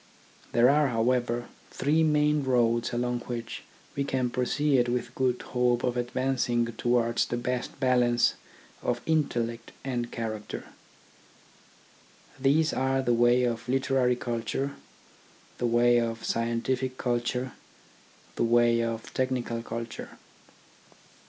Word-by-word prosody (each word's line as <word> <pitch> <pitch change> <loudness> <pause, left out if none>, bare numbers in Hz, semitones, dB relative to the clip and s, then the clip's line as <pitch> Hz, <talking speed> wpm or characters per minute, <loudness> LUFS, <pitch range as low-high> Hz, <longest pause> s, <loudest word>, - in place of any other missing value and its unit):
There 120 +1 +5
are, 145 +2 +4
how 115 0 +1
ever, 120 -1 -1 0.2
three 150 +4 +1
main 150 -1 +3
roads 120 -3 +2
along 120 0 -1
which 120 -2 -5 0.3
we 140 - 0
can 130 -3 -1
proceed 130 0 +1
with 120 0 -2
good 130 -2 0
hope 125 -1 +1
of 125 -1 0
advancing 125 -1 0
towards 120 0 +1
the 120 - -2
best 125 +2 -3
balance 125 -2 +3 0.5
of 120 0 -1
intellect 120 -7 -1
and 120 -3 -3
character: 110 -2 -5 1.7
these 150 +4 +3
are 135 0 +1
the 120 - +2
way 120 +1 +4
of 115 -1 -2
literary 130 -1 +2
culture, 120 +4 -3 0.8
the 120 - +1
way 120 +1 +4
of 115 -1 -2
scien 115 0 -1
tific 130 0 -1
culture, 125 +1 -1 0.9
the - - +1
way 120 0 +4
of 115 -1 -4
technical 125 -3 -1
culture. 115 0 -7
120 Hz, 120 wpm, -28 LUFS, 120-130 Hz, 1.7 s, There